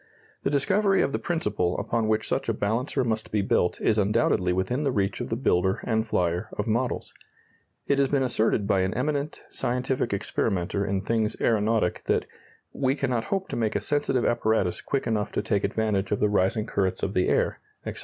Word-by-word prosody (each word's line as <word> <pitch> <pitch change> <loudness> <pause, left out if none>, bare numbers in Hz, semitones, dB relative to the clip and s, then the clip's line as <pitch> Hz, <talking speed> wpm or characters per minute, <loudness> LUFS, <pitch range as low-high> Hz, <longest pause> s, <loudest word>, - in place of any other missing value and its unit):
The - - 0
discovery 195 +8 +2
of - - 0
the - - -1
principle 105 - -1
upon 115 -2 -1
which 110 0 +1
such - - -1
a - - +1
balancer 120 +6 0
must 110 -2 -2
be 105 -2 +1
built 90 -2 +1
is 110 -1 +2
undoubtedly 95 -3 +2
within 95 +9 0
the 140 - +1
reach 100 -4 -1
of - - -4
the 115 - 0
builder 95 -6 +1
and 110 -1 +1
flyer 90 -1 -1
of 105 - -1
models. 120 +3 -1 0.7
It 140 - +2
has 140 - +4
been 135 -1 +1
asserted 110 -4 +1
by 100 -1 +2
an 95 +1 0
eminent 145 +3 -2
scientific 125 0 -1
experimenter 100 -1 -1
in 95 -1 -1
things 110 +1 -1
aeronautic 110 -4 +1
that - - +1 0.5
"we 135 0 +1
cannot 125 -5 -1
hope 195 -1 -2
to - - -3
make 110 -2 0
a - - +2
sensitive 145 -4 0
apparatus 110 -6 +1
quick 140 - -2
enough 110 -3 -1
to - - -1
take 100 -3 0
advantage 105 -1 0
of 105 - +1
the 105 - +3
rising 105 +2 +1
currents 95 -2 -1
of 95 - -1
the 90 - +2
air," - - +1 0.3
etc. - - -5
110 Hz, 195 wpm, -26 LUFS, 100-130 Hz, 0.7 s, has